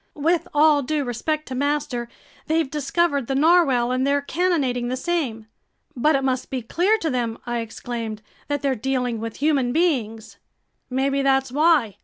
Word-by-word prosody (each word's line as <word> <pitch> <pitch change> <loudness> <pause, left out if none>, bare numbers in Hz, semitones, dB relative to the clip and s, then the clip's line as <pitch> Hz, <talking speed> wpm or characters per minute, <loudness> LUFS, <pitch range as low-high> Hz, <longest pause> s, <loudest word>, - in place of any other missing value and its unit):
"With 330 +3 +1
all 295 0 +4
due 295 +2 -1
respect 305 +5 -2
to - - -4
master, 275 -3 -1 0.4
they've 320 -1 +1
discovered 295 -2 0
the 270 - -1
narwhale 275 -6 +4
and 255 0 0
they're 285 0 +2
cannonading 285 -8 0
the 255 +1 -2
same." 265 -9 -2 0.5
"But 300 +5 +3
it 270 - 0
must 260 -1 -1
be 255 -3 -3
clear 365 - +2
to 325 -7 -2
them," 235 -3 -2
I 240 0 -2
exclaimed, 225 -1 -5 0.2
"that 290 -1 -2
they're 275 -1 +2
dealing 250 -1 -2
with 225 0 -5
human 280 -5 +2
beings." 235 -9 -1 0.5
"Maybe 275 +2 0
that's 270 -1 +2
why!" 295 - +3
270 Hz, 165 wpm, -23 LUFS, 245-310 Hz, 0.5 s, all